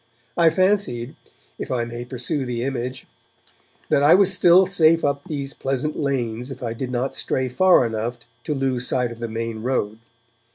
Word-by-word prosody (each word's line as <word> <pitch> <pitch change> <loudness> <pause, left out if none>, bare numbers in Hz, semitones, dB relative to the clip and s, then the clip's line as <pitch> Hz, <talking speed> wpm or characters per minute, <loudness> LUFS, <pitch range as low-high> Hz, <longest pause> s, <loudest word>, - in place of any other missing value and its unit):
I 165 -1 +5
fancied, 175 - 0 0.4
if - - -5
I 120 -2 0
may 120 +1 -7
pursue 130 +3 -3
the 120 -2 -3
image, 130 -1 -4 0.8
that 140 - +3
I 145 +4 +6
was 195 0 +4
still 185 0 +5
safe 165 -3 +3
up 140 +1 -1
these 140 -5 -3
pleasant 135 +3 -3
lanes 125 -4 -2
if 130 -2 -8
I 115 -1 -3
did 125 +2 -5
not 125 +2 -2
stray 130 0 -1
far 180 +2 +4
enough 115 +2 -3 0.3
to 150 - -2
lose 130 -2 -1
sight 125 -2 0
of 115 - -10
the 115 - -3
main 115 0 -4
road. 110 -3 -2
130 Hz, 175 wpm, -22 LUFS, 120-150 Hz, 0.8 s, I